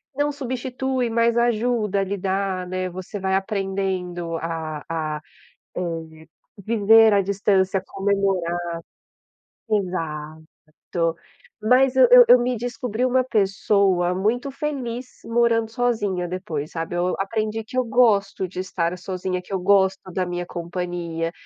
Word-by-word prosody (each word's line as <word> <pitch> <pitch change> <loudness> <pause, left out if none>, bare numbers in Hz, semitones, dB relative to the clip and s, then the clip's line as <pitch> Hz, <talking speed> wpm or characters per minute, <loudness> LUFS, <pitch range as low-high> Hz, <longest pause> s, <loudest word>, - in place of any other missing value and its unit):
não 290 +1 +1
substitui, 260 -2 -2
mas 230 0 +2
ajuda 235 -3 +1
a 195 - +2
lidar, 190 -1 -2
né, 185 0 -3
você 185 +3 -7
vai 190 0 0
aprendendo 190 -4 -2
a 160 -2 -4
a, 155 -2 -3 0.6
eh, 165 -2 -5 0.4
viver 220 0 +5
à 200 - +4
distância, 195 -1 +1
comemorar. 195 -3 0 1.1
Exato. 160 -6 -3 1.1
Mas 255 +3 +4
eu 260 - +8
eu - - +10
eu 250 - +9
me 250 +1 0
descobri 240 0 -3
uma 255 0 +2
pessoa 195 -5 +2
muito 230 +8 0
feliz 260 -4 -4 0.2
morando 230 -1 +2
sozinha 210 -7 -1
depois, 165 -5 -4
sabe. 165 +1 -4
Eu 180 +1 0
aprendi 215 +2 -2
que 255 +4 -5
eu 255 - +3
gosto 210 -5 +2
de 180 0 -6
estar 180 -2 -2
sozinha, 185 0 -3
que 180 - -13
eu 190 - 0
gosto 190 -1 +2
da 185 0 -1
minha 175 0 -3
companhia, 170 -1 -4
195 Hz, 130 wpm, -23 LUFS, 180-230 Hz, 1.1 s, eu